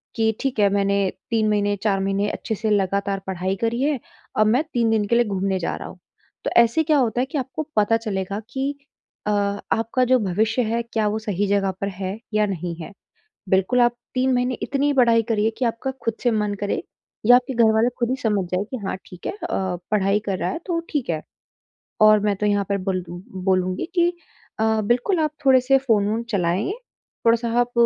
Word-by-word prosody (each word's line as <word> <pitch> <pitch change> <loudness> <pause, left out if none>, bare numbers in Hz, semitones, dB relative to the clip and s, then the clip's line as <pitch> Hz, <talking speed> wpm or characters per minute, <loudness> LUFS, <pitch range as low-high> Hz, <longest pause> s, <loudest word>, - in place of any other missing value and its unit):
कि 225 -1 +2
ठीक 270 -5 -1
है 200 -1 +5
मैंने 200 0 +2 0.3
3 220 -2 +2
महीने, 205 -1 +1
4 200 -3 +2
महीने 195 +1 0
अच्छे 220 - -3
से 215 +2 -2
लगातार 200 0 +1
पढ़ाई 190 0 -1
करी 230 +2 0
है। 290 -2 +1 0.4
अब 215 - +4
मैं 245 +7 +3
3 235 -2 +2
दिन 215 -2 +2
के 235 - +2
लिए 240 0 +4
घूमने 195 -2 -1
जा 170 - -2
रहा - - -7
हूँ। - - -13 0.5
तो - - 0
ऐसे 235 +7 +2
क्या 310 -1 +3
होता 245 -2 +1
है - - +1
कि - - -2
आपको 265 +3 -3
पता 215 +2 +4
चलेगा 200 -3 -3
कि 275 +1 -1 0.5
अ, - - +2
आपका 205 +4 0
जो 255 +1 +4
भविष्य 215 +4 +1
है, 230 +1 0
क्या 225 -2 -1
वो 215 +1 -2
सही 205 -2 -1
जगह 195 -1 +1
पर 200 - 0
है 195 +2 -4
या 215 0 +3
नहीं 175 -3 -4
है? - - -8 0.6
बिल्कुल, 190 +7 +3
आप 240 0 +4 0.2
3 260 0 +2
महीने 250 +1 +1
इतनी 285 +1 +1
पढ़ाई 235 -3 +4
करिए 220 0 +2
कि 260 - 0
आपका 230 +3 -2
खुद 230 - 0
से 245 - +3
मन 210 -2 0
करे, 205 - -1 0.4
या 245 +2 +9
आपके 255 +1 -1
घर 230 -2 +4
वाले 225 +2 +4
खुद 240 -1 0
ही 260 - +1
समझ 210 -4 +1
जाए 185 +2 0
कि 260 - -3
हाँ - - -2
ठीक 180 - -11
है, - - -1
अ, 420 - -4 0.4
पढ़ाई 200 0 +3
कर 195 -2 -1
रहा - - -1
है, - - -3
तो 345 -3 0
ठीक 290 -6 -2
है 155 -2 -2 0.8
और 215 0 +6
मैं 205 0 +1
तो 210 - -1
यहाँ 205 -1 +2
पर 200 - +1
बोल 185 -2 -1
बोलूँगी 185 +1 -2
कि 345 -1 +4 0.5
अ, 220 0 +2
बिल्कुल 245 - +1
आप 305 -1 +1 0.2
थोड़े 260 -1 +7
से 270 +2 +4
फ़ोन-वोन 220 -3 +1
चलाएँ। 190 - 0 0.5
थोड़ा-सा 230 0 +3
आप 245 0 0
215 Hz, 210 wpm, -22 LUFS, 200-245 Hz, 0.8 s, या